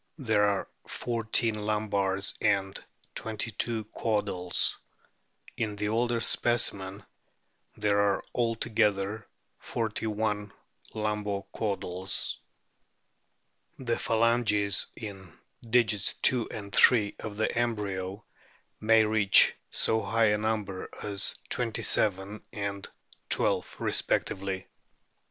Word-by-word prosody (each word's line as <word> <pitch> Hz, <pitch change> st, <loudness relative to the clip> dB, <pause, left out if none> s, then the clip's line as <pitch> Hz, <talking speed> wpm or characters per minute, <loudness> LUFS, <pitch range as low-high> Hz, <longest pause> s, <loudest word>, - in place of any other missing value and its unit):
There 110 Hz, -7 st, +2 dB
are 100 Hz, -1 st, 0 dB, 0.2 s
fourteen 115 Hz, -1 st, -1 dB
lumbars 105 Hz, -2 st, -1 dB
and 95 Hz, -1 st, 0 dB, 0.3 s
twenty 110 Hz, +1 st, -3 dB
two 115 Hz, +1 st, -2 dB
caudals. 105 Hz, -5 st, 0 dB, 0.8 s
In 105 Hz, -2 st, -2 dB
the 105 Hz, 0 st, -2 dB
older 120 Hz, +1 st, +1 dB
specimen 100 Hz, -6 st, 0 dB, 0.7 s
there 105 Hz, -1 st, +2 dB
are 100 Hz, -1 st, +2 dB
altogether 110 Hz, -3 st, 0 dB, 0.3 s
forty 110 Hz, -1 st, -3 dB
one 105 Hz, -1 st, -2 dB, 0.4 s
lumbo 105 Hz, -2 st, -2 dB
caudals. 95 Hz, -3 st, -1 dB, 1.4 s
The 120 Hz, -3 st, -1 dB
phalanges 110 Hz, -3 st, +2 dB
in 95 Hz, -6 st, -9 dB, 0.3 s
digits 110 Hz, -4 st, +2 dB, 0.2 s
II 120 Hz, -3 st, -1 dB
and 100 Hz, -2 st, -7 dB
III 105 Hz, -5 st, +5 dB
of 105 Hz, -2 st, -7 dB
the 110 Hz, -, 0 dB
embryo 105 Hz, -4 st, -2 dB, 0.5 s
may 110 Hz, 0 st, +5 dB
reach 105 Hz, -2 st, +5 dB, 0.2 s
so 110 Hz, 0 st, +2 dB
high 110 Hz, +1 st, +2 dB
a 105 Hz, -, +2 dB
number 105 Hz, -3 st, -2 dB
as 100 Hz, -2 st, +2 dB
twenty 115 Hz, -3 st, -2 dB
seven 100 Hz, +1 st, +2 dB
and 100 Hz, -3 st, -4 dB, 0.4 s
twelve -, -, +3 dB
respectively. 95 Hz, -1 st, -1 dB
105 Hz, 95 wpm, -28 LUFS, 100-110 Hz, 1.4 s, III